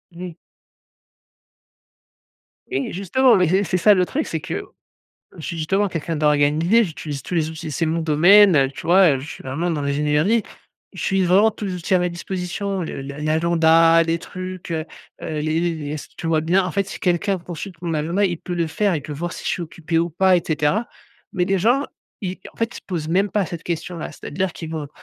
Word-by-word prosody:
Oui. 175 -1 -7 2.4
Oui, 135 - -2
justement, 235 +8 +3
mais 180 -3 +3
c'est 190 +4 +2
c'est 185 - 0
ça, 205 +4 +6
le 180 -2 +2
truc, 305 - -2
c'est - - -3
que - - -4 0.7
je - - -10
suis, 170 - -4
justement, 195 +6 +1
quelqu'un 165 -2 -3
d'organisé. 150 +8 +3
J'utilise 150 -5 -6
tous 180 - -5
les 160 -2 +1
outils, 160 0 -7
c'est 165 +3 -1
mon 165 +1 0
domaine, 175 +4 +6
heu, 135 -1 +3
tu - - -10
vois? 180 -1 +6
Heu, 130 - -6
je 140 - -8
suis - - -9
vraiment 160 +7 -2
dans 150 -3 -2
l'ingénierie. 150 +10 +1 0.5
J'utilise 190 -2 0
vraiment 200 +5 +5
tous 210 -1 -6
les 185 - -3
outils 180 +2 -1
à - - +5
ma 180 0 0
disposition, 185 +2 -4
le 160 - -5
l 140 +1 -7
l'agenda, 165 +1 +4
les 165 0 0
trucs, 185 0 -8
heu 160 -1 -2 0.4
heu, - - -5
les 155 +2 0
les 170 -1 0
les 150 -2 -6
s 155 - -6
tu - - -6
vois 160 -1 +2
bien, 180 +4 +2
en 180 - -2
fait, 200 -1 0
si - - -7
quelqu'un 185 +2 0
consulte 175 +1 -8
mon 170 -1 -2
agenda, 170 +7 0
il 175 -3 0
peut 180 - -5
le 170 -1 0
faire, 180 +3 0
il 145 - -5
peut 150 - -7
voir 175 +4 -4
si - - -9
je - - -1
suis 175 - -2
occupé 165 0 -2
ou 170 +1 +1
pas 185 +2 +4
et 170 - 0
cetera. 155 +9 +1 0.5
Mais 180 -3 +1
les 195 +1 +1
gens, 245 +9 +2 0.4
i 185 0 -4
en - - -27
fait, 230 0 -1
ils - - -9
se - - -8
posent 165 -5 -3
même 195 +3 +2
pas 205 -3 +1
cette 165 0 -7
question-là. 170 0 -4
C'est-à-dire 185 +4 -3
qu'ils 160 -1 -7
vont 155 -3 -4
170 Hz, 220 wpm, -21 LUFS, 155-190 Hz, 2.4 s, ça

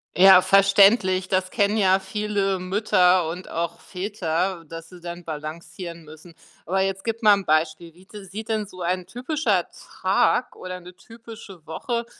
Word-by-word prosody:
Ja 190 0 +8
verständlich, 195 -1 +4
das 185 0 0
kennen 205 0 +1
ja 190 -2 +3
viele 195 -1 -2
Mütter 185 -2 +2
und 180 +3 -7
auch 170 0 -4
Väter, 180 -2 -3
dass 165 0 -9
sie 180 -1 -13
dann 175 0 -8
balancieren 165 +2 -8
müssen. 155 +3 -14 0.3
Aber 190 +3 0
jetzt 195 0 -2
gib 230 0 -3
mal 210 -1 +7
'n 200 -1 -1
Beispiel, 155 +1 0
wie 180 +3 -20 0.2
sieht 210 +4 -8
denn 215 -1 -1
so 185 -2 -12
ein 180 +1 -2
typischer 265 - -1 0.3
Tag - - +2
oder 185 0 -7
'ne 180 +1 -13
typische 225 -5 -13
Woche 235 +9 -4
185 Hz, 155 wpm, -23 LUFS, 170-205 Hz, 0.3 s, Ja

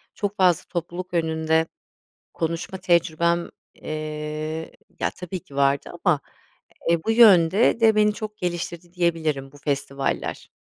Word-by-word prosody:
çok 205 -1 -3
fazla, 180 -2 +4
topluluk 175 +1 -5
önünde 160 -1 +1 0.7
konuşma 170 +3 -3
tecrübem, 170 -1 +2 0.3
eee 155 +1 -5 0.3
ya - - +1
tabii 180 0 -6
ki 140 - -15
vardı, 140 0 +2
ama, - - +3 0.7
e, 170 -1 +2
bu - - 0
yönde 215 -1 +6
de, 225 -1 +5
beni 210 0 +4
çok 215 -1 -6
geliştirdi 175 -1 -4
diyebilirim 160 -6 -1
bu - - -15
festivaller. 140 -1 -2
170 Hz, 125 wpm, -24 LUFS, 155-185 Hz, 0.7 s, yönde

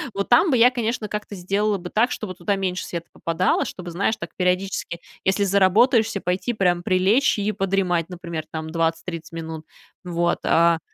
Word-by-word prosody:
вот 200 0 -2
там 285 +9 +5
бы 255 - +3
я, 245 +2 +6
конечно, 230 -2 -2
как-то 210 -1 -5
сделала 200 +3 0
бы 180 -1 -8
так, 235 +4 +3
чтобы 195 -4 -5
туда 190 +3 -1
меньше 185 -1 -2
света 170 -1 -6
попадало, 165 +2 0
чтобы, 180 -2 -7
знаешь, 200 +6 0
так - - -7
периодически, 180 -1 -1 0.2
если 190 +2 +2
заработаешься, 210 +3 +3
пойти 185 +6 -1
прям 180 -5 +1
прилечь 195 +9 +2
и 205 +1 0
подремать, 190 -4 0
например, 170 -3 -6
там, 160 0 -5
20-30 165 0 -2
минут. 160 -1 -6 0.4
Вот, 175 -1 0
а. 170 0 +4
185 Hz, 170 wpm, -23 LUFS, 170-210 Hz, 0.4 s, я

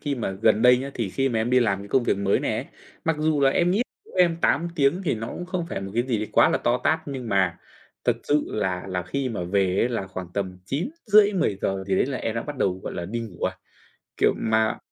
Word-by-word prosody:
khi 145 -1 -2
mà 120 -6 -3
gần 110 0 +4
đây 125 0 +7
nhá, 135 +1 -5
thì 115 -4 -2
khi 135 +6 0
mà 115 - 0
em 110 +2 0
đi 125 0 +5
làm 100 -5 +1
cái 100 - -9
công 130 +4 +3
việc 120 - +1
mới 100 0 +2
này - - -1
ấy, - - -4 0.4
mặc 160 -1 +1
dù 155 -1 +1
là 135 -1 +5
em 175 +5 +2
nghĩ 200 +6 +2 0.3
em 175 -2 +4
8 170 0 +2
tiếng 150 +5 +2
thì 155 - +1
nó 115 +1 -5
cũng 175 - -6
không 180 -2 -3
phải - - -4
một 95 0 -6
cái 120 - +2
gì 120 -3 -1
đấy 105 0 -3
quá - - +6
là - - +1
to 120 +1 +1
tát 160 +3 +3
nhưng 130 -5 -5
mà 95 -3 +1 0.5
thật - - +2
sự 145 0 +2
là 95 -4 -2
là 90 -1 -2
khi 130 +8 -2
mà 105 -7 -3
về 95 +1 +1
ấy 115 - +2
là 115 -6 -3
khoảng 95 -1 -6
tầm 95 -2 -3
9:30-10:00 190 - +1
gì 95 - +1
đấy - - +2
là 135 -1 -3
em 115 - -3
đã 115 - -2
bắt 145 -1 -6
đầu, 95 -4 0
gọi - - -5
là, 85 - -4
đi 115 +5 -3
ngủ 110 -7 -8
rồi. - - +2 0.7
Kiểu, - - +4
mà 110 0 +1
120 Hz, 265 wpm, -24 LUFS, 100-145 Hz, 0.7 s, đây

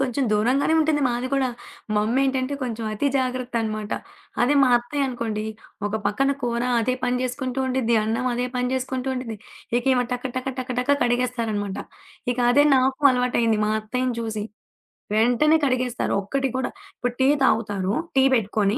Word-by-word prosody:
కొంచెం 270 0 0
దూరంగానే 255 +9 +2
ఉంటుంది 310 -1 +2
మాది 245 +1 -2
కూడా. 270 -2 +2 0.5
మా 210 - +3
అమ్మెంటంటే 265 +3 +1
కొంచెం 230 -3 -3
అతి 215 +7 -1
జాగ్రత్త 255 -1 -2
అనమాట. 215 -1 -4 0.5
అదే 265 +4 +3
మా 265 - +5
అత్తయ్య 255 +4 -1
అనుకోండి. 225 -4 -3 0.4
ఒక 205 - -4
పక్కన 270 +7 +1
కూర 235 -1 -1 0.2
అదే 250 +3 0
పని 250 0 +1
జేసుకుంటూ 255 0 -3
ఉండిద్ది. 255 -3 +1
అన్నం 230 +4 -1
అదే 245 +1 -1
పని 250 0 0
జేసుకుంటూ 260 0 -2
ఉండిద్ది. 245 -4 -5 0.4
ఇక 245 - -6
ఇవా 250 -1 +2
టక, 250 0 -4
టక, 255 - -3
టక, 255 0 -4
టక 280 +3 +2
కడిగేస్తారనమాట. 235 -5 -1 0.6
ఇక 245 - -9
అదే 285 +4 +5
నాకు 260 +1 +1
అలవాటైంది, 245 -3 +1
మా - - 0
అత్తయ్యని 250 +3 -2
చూసి. 220 -2 -3 0.7
వెంటనే 245 +8 +4
కడిగేస్తారు. 255 -2 0
ఒక్కటి 270 +7 -1
కూడా, 260 - -1 0.3
ఇప్పుడు 245 0 -2
టీ 265 - +5 0.2
తాగుతారు, 205 -5 +1 0.2
టీ 265 - +6
పెట్టుకొని. 210 -1 +1
250 Hz, 160 wpm, -23 LUFS, 225-260 Hz, 0.7 s, టీ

